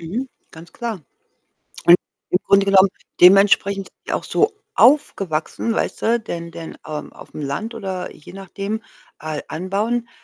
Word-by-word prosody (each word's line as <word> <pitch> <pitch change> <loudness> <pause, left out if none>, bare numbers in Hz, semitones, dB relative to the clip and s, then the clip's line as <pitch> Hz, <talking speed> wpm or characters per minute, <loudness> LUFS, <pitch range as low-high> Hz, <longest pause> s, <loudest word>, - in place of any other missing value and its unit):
Mhm, 220 +11 -4 0.2
ganz 165 +1 -14
klar. 230 -5 -5 0.9
Und, 175 +1 +9 0.3
im 180 - +3
Grunde 200 0 +5
genommen, 195 0 +6 0.3
dementsprechend 195 +1 +5
sind - - -42
die - - -2
auch - - -1
so 430 +1 +1 0.2
aufgewachsen, 225 - +2
weißt - - -2
du? 235 +1 +2
Denn 170 -5 -6
denn, 165 0 -9
ähm, 155 -1 -6
auf - - -15
'm 150 - -5
Land 215 +12 -4
oder 190 -4 -5
je 150 - -14
nachdem, 195 +3 -5 0.4
äh, 155 -1 -4
anbauen, 210 +8 -2
195 Hz, 150 wpm, -21 LUFS, 170-220 Hz, 0.9 s, Und